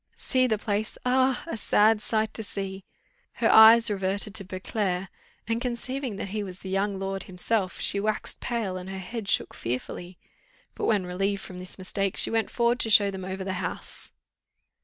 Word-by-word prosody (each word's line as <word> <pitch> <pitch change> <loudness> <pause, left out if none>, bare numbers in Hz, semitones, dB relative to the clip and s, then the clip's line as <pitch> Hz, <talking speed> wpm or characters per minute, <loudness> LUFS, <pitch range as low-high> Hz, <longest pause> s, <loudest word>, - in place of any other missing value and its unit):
"See 255 -1 +2
the 220 -3 +1
place! 210 +1 -2
ah! 260 +1 +2
a 335 - -4
sad 215 0 +3
sight 220 -1 0
to 220 - -2
see." 195 -2 -5 0.5
Her - - +2
eyes 225 +1 +8
reverted 195 +1 -1
to 220 -2 -1
Beauclerc, 185 0 -2 0.4
and, 230 +1 -1
conceiving 250 0 -3
that 195 - -5
he 210 +1 -2
was 185 -2 -8
the 190 - -6
young 195 +1 0
lord 195 0 -3
himself, 185 +1 -1
she 200 - +1
waxed 215 +1 -2
pale, 225 -6 -2
and 185 +1 -7
her 190 - -5
head 200 +2 -6
shook - - +1
fearfully; 175 +9 -5 0.6
but, - - -3
when 205 -4 +2
relieved 195 +2 -1
from 180 -1 -8
this 185 0 -5
mistake, 195 +1 -2
she - - +3
went 225 -2 +1
forward 240 +1 +1
to 225 - +1
show 205 -2 +6
them 190 -1 -6
over 190 +1 -4
the 190 0 -3
house. - - -5
200 Hz, 185 wpm, -27 LUFS, 190-225 Hz, 0.6 s, eyes